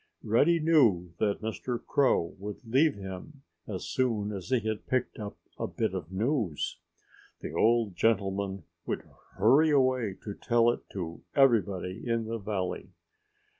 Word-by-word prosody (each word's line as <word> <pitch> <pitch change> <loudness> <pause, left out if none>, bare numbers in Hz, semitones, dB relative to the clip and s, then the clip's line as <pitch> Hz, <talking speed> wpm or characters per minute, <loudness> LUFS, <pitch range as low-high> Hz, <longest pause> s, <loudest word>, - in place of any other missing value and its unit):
Reddy 150 +10 +3
knew 120 - +3
that 100 -2 0
Mr. 110 +3 -3
Crow 130 -11 +2
would 105 +4 -7
leave 140 +6 +3
him 100 +9 -9 0.2
as 95 -4 -5
soon 110 -5 0
as 95 0 -6
he 130 -2 +3
had 110 0 -3
picked 130 -2 -1
up 105 -1 -6 0.2
a - - -1
bit - - -2
of 80 - -5
news. 110 - -1 0.6
The - - -6
old 115 -4 +2
gentleman 100 -1 0 0.2
would - - -3 0.3
hurry 135 +10 +5
away 130 -8 +2
to 105 - -5
tell 120 +1 +3
it - - -4
to 85 -4 -5
everybody 100 - +2
in 115 -1 0
the 115 +1 -3
valley. 95 -3 -3
110 Hz, 145 wpm, -29 LUFS, 95-130 Hz, 0.6 s, hurry